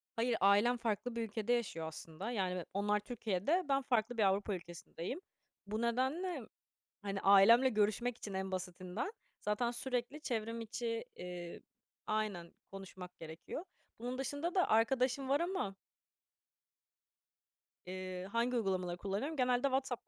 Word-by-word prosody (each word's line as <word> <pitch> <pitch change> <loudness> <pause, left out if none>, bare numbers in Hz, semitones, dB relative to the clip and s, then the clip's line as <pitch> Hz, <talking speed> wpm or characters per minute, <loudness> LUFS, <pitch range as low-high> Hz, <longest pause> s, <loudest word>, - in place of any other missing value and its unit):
Hayır, 230 0 +2
ailem 205 +5 +5
farklı 230 +1 -1
bir 235 - -1
ülkede 225 +2 0
yaşıyor 185 -9 -1
aslında. 160 +7 -6
Yani, 185 -5 0
be 180 - -3
onlar 205 +1 +2
Türkiye'de, 225 - 0
ben 275 0 +4
farklı 240 -2 +1
bir 215 - +4
Avrupa 200 +1 +2
ülkesindeyim. 175 - -6 0.5
Bu 215 +2 -2
nedenle, 265 +8 0 0.6
hani, 195 -1 -3
ailemle 215 +6 +8
görüşmek 220 +2 +1
için 205 - -6
en 190 0 -2
basitinden, 185 - -3 0.3
zaten 210 +3 +1
sürekli 250 +3 -2
çevrim 230 -4 -2
içi 230 +2 -3
iii, 175 -1 -6 0.5
aynen 210 -6 -1 0.2
konuşmak 190 -2 -9
gerekiyor. 165 - -6 0.4
Bunun 250 +2 -3
dışında 285 +7 -2
da 365 - +4
arkadaşım 255 +3 +3
var 280 +1 +4
ama 340 - -1 2.1
Iıı, 185 0 -5
hangi 235 +4 +1
uygulamaları 185 -5 0
kullanıyorum? 205 - -2
Genelde 250 -1 +3
WhatsApp 265 -2 -1
220 Hz, 130 wpm, -36 LUFS, 190-245 Hz, 2.1 s, ailemle